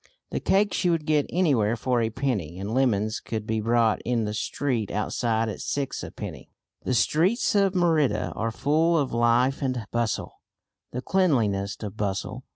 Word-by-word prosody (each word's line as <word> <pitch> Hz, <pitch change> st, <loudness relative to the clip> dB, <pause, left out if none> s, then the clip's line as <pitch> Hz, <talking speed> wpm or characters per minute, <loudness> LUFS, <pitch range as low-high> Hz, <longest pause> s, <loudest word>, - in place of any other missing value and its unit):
The -, -, -1 dB
cakes 200 Hz, +1 st, +1 dB
you 180 Hz, -, +3 dB
would 165 Hz, -3 st, 0 dB
get 150 Hz, -2 st, +2 dB
anywhere 135 Hz, -, +2 dB
for 120 Hz, +1 st, 0 dB
a 110 Hz, -, +1 dB
penny, 110 Hz, -, -2 dB
and 100 Hz, +3 st, -4 dB
lemons 110 Hz, -4 st, +1 dB
could 110 Hz, -1 st, -5 dB
be 110 Hz, 0 st, -1 dB
bought 115 Hz, 0 st, +2 dB
in 120 Hz, -2 st, 0 dB
the 105 Hz, -, -3 dB
street 115 Hz, 0 st, -2 dB
outside 110 Hz, +1 st, 0 dB
at 105 Hz, -, -5 dB
six 140 Hz, -2 st, -2 dB
a -, -, -6 dB
penny. -, -, -8 dB, 0.3 s
The 130 Hz, -, 0 dB
streets 180 Hz, -, +2 dB
of 200 Hz, -2 st, +2 dB
Merida 165 Hz, -6 st, +2 dB
are 115 Hz, -, -1 dB
full 155 Hz, +8 st, +2 dB
of 140 Hz, -4 st, 0 dB
life 120 Hz, +4 st, +2 dB
and 130 Hz, -5 st, -2 dB
bustle, 120 Hz, -2 st, -2 dB, 0.5 s
the 125 Hz, +1 st, -4 dB
cleanliest 110 Hz, -, +1 dB
of 105 Hz, 0 st, -6 dB
bustle. 100 Hz, -2 st, -3 dB
120 Hz, 170 wpm, -26 LUFS, 110-150 Hz, 0.5 s, you